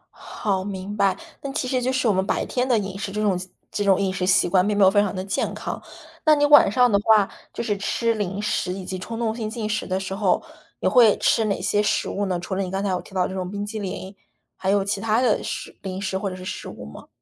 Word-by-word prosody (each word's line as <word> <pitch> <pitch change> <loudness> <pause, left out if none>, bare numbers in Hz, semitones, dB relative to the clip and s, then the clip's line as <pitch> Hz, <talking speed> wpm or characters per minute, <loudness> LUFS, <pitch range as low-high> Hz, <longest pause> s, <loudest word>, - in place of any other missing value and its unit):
好， 195 -4 -2
明 195 +1 -5
白， 195 -2 +2 0.2
那 275 - -5
其 270 -2 -2
实 255 0 0
就 255 - 0
是 260 -2 +1
我 215 - +4
们 190 0 +1
白 - - 0
天 250 0 -1
的 240 - +4
饮 195 -2 -3
食， 195 0 -4
这 210 - -3
种 200 -4 +1 0.3
这 205 - -1
种 195 -2 +4
饮 195 -1 0
食 185 -1 -2
习 185 - +4
惯 185 +1 +3
并 210 -1 0
没 200 - +5
有 190 - +7
非 205 0 +4
常 205 -2 -1
地 185 - -3
健 195 +1 -1
康。 - - -5 0.4
那 310 -1 +7
你 290 0 +3
晚 290 -8 +7
上 250 +2 +4
的 200 - +4
话， 215 -2 +4 0.2
就 - - -4
是 215 -3 0
吃 230 +3 0
零 200 -3 -3
食 205 -3 -1
以 190 0 -7
及 185 0 -5
冲 225 +4 -6
动 225 -2 -1
性 220 -2 -3
进 225 -2 -4
食 215 0 -2
的 185 0 -1
时 190 0 -5
候， 195 - +1 0.4
你 - - +1
会 235 -5 +6
吃 225 - +2
哪 200 -2 -1
些 205 - +1
食 210 - 0
物 200 0 -2
呢？ 180 -2 -1
除 175 +3 -5
了 190 - 0
你 185 - -3
刚 195 +2 -2
才 200 - 0
有 180 - -1
提 195 - -15
到 180 -1 +2
这 190 - -7
种 185 -1 -3
冰 205 +1 -4
淇 215 +1 -5
淋， 190 0 -6 0.4
还 190 - -3
有 200 0 +2
其 200 0 -2
他 220 +1 +2
的 245 -4 +2
食 - - -5
零 190 -1 -5
食 190 -1 -3
或 195 +1 -2
者 185 - -6
是 185 0 -9
食 195 - -5
物 - - -9
吗？ - - -11
200 Hz, 305 characters per minute, -23 LUFS, 190-220 Hz, 0.4 s, 有